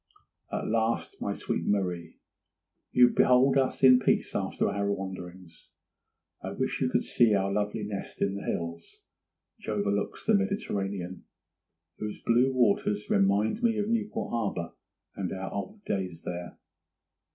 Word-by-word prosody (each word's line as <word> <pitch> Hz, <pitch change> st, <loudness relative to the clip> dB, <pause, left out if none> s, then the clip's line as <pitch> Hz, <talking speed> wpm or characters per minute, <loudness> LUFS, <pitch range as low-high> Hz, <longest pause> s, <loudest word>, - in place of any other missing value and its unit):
'At -, -, -2 dB
last, 115 Hz, +1 st, -1 dB
my -, -, -1 dB
sweet -, -, -3 dB
Marie, 90 Hz, -5 st, -1 dB, 0.7 s
you 125 Hz, 0 st, +6 dB
behold 130 Hz, +2 st, +4 dB
us 135 Hz, 0 st, +1 dB
in 130 Hz, -1 st, +8 dB
peace -, -, +1 dB
after -, -, 0 dB
our 100 Hz, 0 st, 0 dB
wanderings. 90 Hz, -3 st, -7 dB, 0.7 s
I -, -, -5 dB
wish -, -, -2 dB
you -, -, +2 dB
could -, -, +1 dB
see 115 Hz, -3 st, +3 dB
our 100 Hz, 0 st, +1 dB
lovely 105 Hz, +1 st, -1 dB
nest 100 Hz, -1 st, -6 dB
in 100 Hz, -, +1 dB
the 100 Hz, -, -5 dB
hills, 85 Hz, 0 st, -5 dB, 0.6 s
which -, -, -8 dB
overlooks 100 Hz, -1 st, -1 dB
the 220 Hz, -, +3 dB
Mediterranean, 100 Hz, -, -1 dB, 0.7 s
whose 105 Hz, -1 st, -5 dB
blue 125 Hz, +3 st, +3 dB
waters 105 Hz, -4 st, +1 dB
remind 100 Hz, -, +2 dB
me 230 Hz, -2 st, +2 dB
of 210 Hz, 0 st, -1 dB
Newport 220 Hz, -2 st, -1 dB
harbour 100 Hz, -7 st, -2 dB, 0.4 s
and 95 Hz, -4 st, -3 dB
our 95 Hz, 0 st, -5 dB
old 205 Hz, -, -6 dB
days 90 Hz, -4 st, -3 dB
there. 90 Hz, 0 st, -6 dB
100 Hz, 140 wpm, -28 LUFS, 95-125 Hz, 0.7 s, in